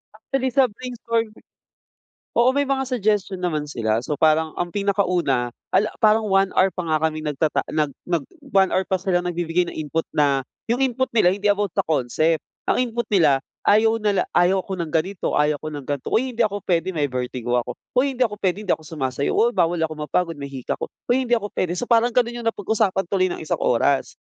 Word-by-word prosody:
Actually, 260 Hz, +4 st, -2 dB
sa 260 Hz, +1 st, +4 dB
brainstorm 230 Hz, -1 st, -3 dB, 1.1 s
oo. 240 Hz, +2 st, +5 dB
May 285 Hz, -, +3 dB
mga 270 Hz, -1 st, +1 dB
suggestion 205 Hz, -6 st, 0 dB
naman 155 Hz, -4 st, -1 dB
sila. 110 Hz, -5 st, 0 dB
So 150 Hz, -, -2 dB
parang 155 Hz, +1 st, +2 dB
ang 175 Hz, -, -2 dB
pinakauna, 180 Hz, -11 st, +1 dB, 0.3 s
ala, 215 Hz, +2 st, +3 dB
parang 220 Hz, -1 st, +4 dB
1 195 Hz, 0 st, +3 dB
hour 190 Hz, -, +4 dB
pa 180 Hz, -2 st, -5 dB
nga 155 Hz, -1 st, +2 dB
kami 155 Hz, 0 st, -6 dB
nagtata 150 Hz, +1 st, 0 dB
nag 150 Hz, -2 st, +1 dB, 0.2 s
nag 170 Hz, -5 st, 0 dB, 0.3 s
1 190 Hz, -1 st, +5 dB
hour 190 Hz, -, +1 dB
pa 190 Hz, -, +1 dB
silang 180 Hz, -2 st, 0 dB
nagbibigay 175 Hz, 0 st, 0 dB
ng -, -, -7 dB
input 155 Hz, +1 st, -2 dB
na, 140 Hz, -3 st, +2 dB, 0.3 s
yung 245 Hz, -, +1 dB
input 260 Hz, 0 st, +1 dB
nila 185 Hz, -6 st, +4 dB
hindi 205 Hz, 0 st, 0 dB
about 205 Hz, -3 st, -1 dB
the -, -, +2 dB
concept. 155 Hz, +2 st, +1 dB, 0.3 s
Ang 250 Hz, -, +2 dB
input 235 Hz, -, 0 dB
nila, 150 Hz, -8 st, +4 dB, 0.3 s
ayaw 225 Hz, +2 st, +4 dB
nila 205 Hz, -3 st, +1 dB
ayaw 185 Hz, +2 st, +4 dB
ko 190 Hz, -, -5 dB
ng 170 Hz, -, -2 dB
ganito, 180 Hz, +4 st, -1 dB
ayaw 150 Hz, 0 st, +2 dB
ko 155 Hz, -, -7 dB
ng 145 Hz, -, -6 dB
gan'to, 145 Hz, -2 st, -4 dB
"Uy 255 Hz, +3 st, +1 dB
hindi 235 Hz, -, -13 dB
ako 205 Hz, -1 st, -3 dB
puwede, 180 Hz, +1 st, 0 dB
may 145 Hz, -2 st, 0 dB
vertigo 125 Hz, -1 st, -2 dB
ako." 120 Hz, -, -5 dB, 0.2 s
"Huy, 275 Hz, +1 st, +3 dB
hindi 250 Hz, -, +3 dB
ako 210 Hz, -3 st, -2 dB
puwede, 190 Hz, +1 st, 0 dB
hindi 190 Hz, -, +1 dB
ako 160 Hz, -, -6 dB
sumasayaw." 140 Hz, -3 st, -2 dB
"O, 235 Hz, -, +4 dB
bawal 175 Hz, -6 st, +1 dB
ako 160 Hz, -1 st, -1 dB
mapagod, 170 Hz, -1 st, -1 dB
may 140 Hz, -, -5 dB
hika 130 Hz, -3 st, -4 dB
ako." -, -, -3 dB, 0.2 s
"Huy, 260 Hz, +1 st, +2 dB
hindi 240 Hz, -, +1 dB
ako 205 Hz, -2 st, -3 dB
puwede." 175 Hz, -1 st, -1 dB
So, 245 Hz, -, -3 dB
parang 235 Hz, 0 st, +4 dB
ganun 240 Hz, -1 st, +1 dB
yung 230 Hz, -, -4 dB
napag-usapan 205 Hz, -2 st, 0 dB
tuloy 185 Hz, -2 st, +2 dB
ng -, -, -5 dB
isang -, -, -2 dB
oras. 135 Hz, +3 st, +1 dB
185 Hz, 210 wpm, -22 LUFS, 155-220 Hz, 1.1 s, oo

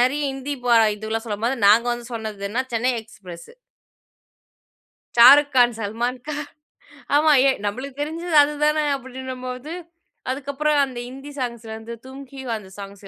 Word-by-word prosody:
நிறைய 265 Hz, +4 st, +2 dB
ஹிந்தி 270 Hz, +2 st, -4 dB
பா 240 Hz, -1 st, +4 dB, 0.2 s
இதுவெல்லாம் 220 Hz, +2 st, -4 dB
சொல்லும்போது, 225 Hz, +5 st, -1 dB
நாங்க 225 Hz, +4 st, +5 dB
வந்து 240 Hz, -1 st, -6 dB
சொன்னது 215 Hz, -3 st, -5 dB
என்னா, 245 Hz, +5 st, 0 dB
"சென்னை 245 Hz, +3 st, +1 dB
எக்ஸ்பிரஸ்". 185 Hz, -6 st, -12 dB, 1.7 s
ஷாருக்கான், 255 Hz, 0 st, +7 dB
சல்மான்கான். 245 Hz, +8 st, -3 dB, 0.7 s
ஆமா 305 Hz, +1 st, +5 dB, 0.2 s
எ -, -, +5 dB
நம்பளுக்கு 260 Hz, +7 st, -5 dB
தெரிஞ்சது 325 Hz, +2 st, -3 dB
அதுதானே! 300 Hz, +1 st, +1 dB
அப்படின்னும்போது, 260 Hz, +1 st, -7 dB, 0.6 s
அதுக்கப்புறம் 285 Hz, +3 st, -1 dB
அந்த 255 Hz, -2 st, -8 dB
ஹிந்தி 270 Hz, +3 st, -10 dB
சாங்ஸ்ல 235 Hz, -3 st, -5 dB
இருந்து 225 Hz, +1 st, -8 dB
தும்கிவா 265 Hz, -2 st, -7 dB
அந்த 190 Hz, -2 st, -14 dB
சாங்ஸ் 200 Hz, 0 st, -10 dB
255 Hz, 125 wpm, -22 LUFS, 225-280 Hz, 1.7 s, ஷாருக்கான்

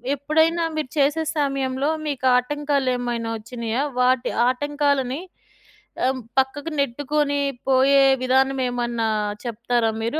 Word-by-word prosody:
ఎప్పుడైనా 320 Hz, +4 st, +1 dB
మీరు 310 Hz, -4 st, -3 dB
చేసే 290 Hz, +3 st, +2 dB
సమయంలో 275 Hz, -1 st, 0 dB, 0.2 s
మీకు 275 Hz, -3 st, -3 dB
ఆటంకాలేమైనా 250 Hz, -4 st, -1 dB
వచ్చినాయా? 230 Hz, +3 st, -3 dB, 0.2 s
వాటి 250 Hz, 0 st, +2 dB, 0.2 s
ఆటంకాలని 285 Hz, 0 st, 0 dB, 0.9 s
ఆహ్, 260 Hz, 0 st, 0 dB, 0.2 s
పక్కకు 280 Hz, +4 st, -1 dB
నెట్టుకొని 285 Hz, +2 st, 0 dB, 0.3 s
పోయే 270 Hz, +1 st, +5 dB, 0.2 s
విధానం 265 Hz, +1 st, +2 dB
ఏమన్నా 240 Hz, -2 st, -1 dB, 0.4 s
చెప్తారా 235 Hz, 0 st, 0 dB
మీరు? 235 Hz, +8 st, -1 dB
265 Hz, 100 wpm, -22 LUFS, 245-290 Hz, 0.9 s, పోయే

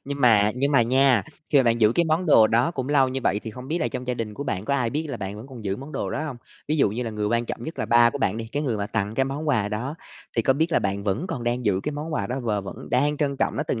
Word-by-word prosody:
Nhưng 140 Hz, 0 st, -5 dB
mà 105 Hz, -4 st, +5 dB
nhưng 140 Hz, +3 st, 0 dB
mà 135 Hz, -, +5 dB
nha, 130 Hz, -1 st, +4 dB, 0.3 s
khi 145 Hz, -, +5 dB
mà -, -, +5 dB
bạn 115 Hz, 0 st, +2 dB
giữ 110 Hz, 0 st, +5 dB
cái 170 Hz, -, +2 dB
món 160 Hz, +3 st, 0 dB
đồ 115 Hz, -8 st, +7 dB
đó 120 Hz, +8 st, +2 dB
cũng 130 Hz, -5 st, -4 dB
lâu 140 Hz, -3 st, +4 dB
như 130 Hz, +1 st, -3 dB
vậy 105 Hz, -, +1 dB
thì 110 Hz, -, -6 dB
không 125 Hz, +4 st, -10 dB
biết 165 Hz, +3 st, 0 dB
là -, -, 0 dB
trong 125 Hz, -1 st, -6 dB
gia 125 Hz, -, -1 dB
đình 110 Hz, -3 st, -4 dB
của 140 Hz, -, -5 dB
bạn 95 Hz, -8 st, -3 dB
có 140 Hz, -, 0 dB
ai 125 Hz, -4 st, 0 dB
biết 155 Hz, +5 st, -2 dB
là 135 Hz, -, -4 dB
bạn 100 Hz, -1 st, -5 dB
vẫn 110 Hz, +4 st, -9 dB
còn 125 Hz, -5 st, -10 dB
giữ 95 Hz, -1 st, -1 dB
món 140 Hz, +5 st, -9 dB
đồ -, -, -3 dB
đó 155 Hz, -, -2 dB
hông? 140 Hz, -5 st, -5 dB, 0.3 s
Ví 155 Hz, -, +1 dB
dụ 135 Hz, -, +3 dB
như 115 Hz, +5 st, -3 dB
là 115 Hz, -, -3 dB
người 105 Hz, -1 st, -2 dB
quan 115 Hz, +2 st, +1 dB
trọng 120 Hz, -, -6 dB
nhất 160 Hz, -, -7 dB
là -, -, -1 dB
ba 120 Hz, 0 st, +5 dB
của 140 Hz, -, -5 dB
bạn 105 Hz, -5 st, 0 dB
đi, 115 Hz, 0 st, -5 dB
cái 145 Hz, -, -1 dB
người 125 Hz, -7 st, -1 dB
mà 100 Hz, -1 st, -2 dB
tặng 105 Hz, +1 st, -2 dB
cái 135 Hz, -, +2 dB
món 140 Hz, +3 st, -4 dB
quà 105 Hz, -8 st, +2 dB
đó, 115 Hz, +8 st, -3 dB, 0.4 s
thì 115 Hz, -, +3 dB
có 135 Hz, -, +4 dB
biết 160 Hz, +5 st, 0 dB
là -, -, +4 dB
bạn 100 Hz, 0 st, -2 dB
vẫn 105 Hz, -, -1 dB
còn 125 Hz, -9 st, -4 dB
đang 120 Hz, +1 st, -1 dB
giữ 95 Hz, -3 st, +2 dB
cái 150 Hz, -, -3 dB
món 150 Hz, +3 st, -5 dB
quà 100 Hz, -, -1 dB
đó 125 Hz, +5 st, -3 dB
và 110 Hz, -4 st, -1 dB
vẫn 95 Hz, -, -9 dB
đang 145 Hz, +4 st, +2 dB
trân 140 Hz, -2 st, -1 dB
trọng -, -, 0 dB
nó -, -, 0 dB
từng 130 Hz, -6 st, -2 dB
125 Hz, 345 wpm, -24 LUFS, 110-140 Hz, 0.4 s, đồ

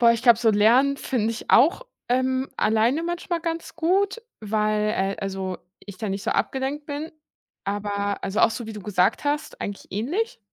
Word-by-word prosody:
Boah, 235 Hz, -1 st, +7 dB
ich 230 Hz, -, -3 dB
glaube, 235 Hz, -3 st, +6 dB
so 225 Hz, -, +4 dB
lernen 240 Hz, +7 st, +4 dB
finde 230 Hz, -5 st, -1 dB
ich 230 Hz, -, -5 dB
auch, 325 Hz, -, +5 dB, 0.2 s
ähm, 260 Hz, +1 st, +1 dB
alleine 225 Hz, +8 st, +2 dB
manchmal 345 Hz, 0 st, -2 dB
ganz 330 Hz, 0 st, -4 dB
gut, 385 Hz, +6 st, +1 dB, 0.2 s
weil 215 Hz, 0 st, +1 dB
äh, 195 Hz, -1 st, -1 dB
also, 190 Hz, -2 st, -3 dB, 0.2 s
ich 200 Hz, -2 st, -11 dB
da 215 Hz, -, -3 dB
nicht 195 Hz, 0 st, -3 dB
so -, -, -1 dB
abgelenkt 270 Hz, +3 st, -1 dB
bin. 300 Hz, +2 st, -5 dB, 0.5 s
Aber, 200 Hz, 0 st, -2 dB
also, 195 Hz, +2 st, -1 dB
auch -, -, +6 dB
so 235 Hz, 0 st, -5 dB
wie 220 Hz, -, -6 dB
du 210 Hz, -, -7 dB
gesagt 190 Hz, +3 st, +1 dB
hast, 295 Hz, +1 st, -2 dB
eigentlich 200 Hz, -1 st, -5 dB
ähnlich. 320 Hz, -, -2 dB
230 Hz, 180 wpm, -24 LUFS, 205-290 Hz, 0.5 s, Boah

